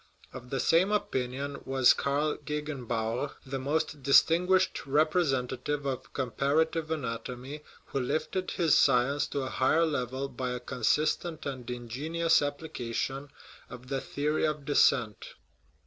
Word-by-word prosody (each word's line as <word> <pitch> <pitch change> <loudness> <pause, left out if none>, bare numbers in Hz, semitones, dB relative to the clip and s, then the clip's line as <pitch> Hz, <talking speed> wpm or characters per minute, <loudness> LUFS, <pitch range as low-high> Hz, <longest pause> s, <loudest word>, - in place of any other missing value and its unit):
Of 125 -1 -9
the 135 - -2
same 170 +9 +3
opinion 140 -7 -2
was 130 -2 +5
Karl 145 +2 0
Gegenbaur, 140 -4 -3
the 135 0 -4
most 150 +2 -1
distinguished 175 +7 +3
representative 145 -2 0
of 135 -2 -4
comparative 150 +5 0
anatomy, 125 0 -5 0.2
who 140 - -3
lifted 155 +8 -2
his 165 -4 +2
science 130 +4 +3
to 140 - -3
a 130 - -3
higher 155 +7 +2
level 135 -3 -2
by 125 -1 -4
a 125 - -4
consistent 150 +6 0
and 130 -4 -5
ingenious 140 +8 0
application 140 -2 -3 0.4
of 125 0 -11
the 135 -1 -1
theory 150 +2 -1
of 150 -2 -3
descent. 125 -6 +2
140 Hz, 125 wpm, -29 LUFS, 125-155 Hz, 0.4 s, was